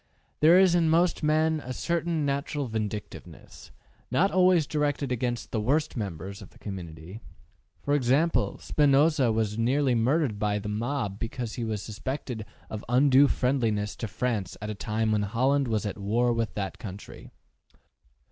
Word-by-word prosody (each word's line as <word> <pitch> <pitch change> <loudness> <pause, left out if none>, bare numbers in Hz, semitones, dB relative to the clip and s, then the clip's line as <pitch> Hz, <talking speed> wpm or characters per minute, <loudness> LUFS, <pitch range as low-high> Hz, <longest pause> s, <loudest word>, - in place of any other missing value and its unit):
There 165 +4 +7
is 185 -2 +5
in 170 -2 +3
most 170 +2 +2
men 155 +1 +2
a 130 - -5
certain 170 0 -1
natural 140 +1 -2
vindictiveness, 110 -2 -6 0.4
not 175 +11 +2
always 180 -3 +4
directed 145 -2 -1
against 120 -1 -2
the 110 - -1
worst 150 +7 0
members 100 -2 -5
of 100 - -11
the - - -20
community. 90 0 -8 0.6
For 145 - 0
example, 145 +5 +2
Spinoza 145 -3 +3
was 110 -2 0
very 115 +2 -1
nearly 135 +1 +2
murdered 120 -1 +1
by 105 -1 0
the 105 0 -5
mob 110 -2 -2
because 115 0 -4
he 120 - -4
was 110 -3 -3
suspected 115 0 -5 0.2
of 110 -1 -6
undue 135 +2 +5
friendliness 115 -7 0
to 115 - -4
France 110 -3 -2
at 105 +1 -4
a - - -3
time 110 +1 -1
when 105 -1 +2
Holland 130 +7 +1
was 110 -2 -1
at 100 -1 -4
war 120 +5 +1
with 115 -1 -2
that 100 -2 -4
country. 100 -4 -9
120 Hz, 160 wpm, -27 LUFS, 105-145 Hz, 0.6 s, There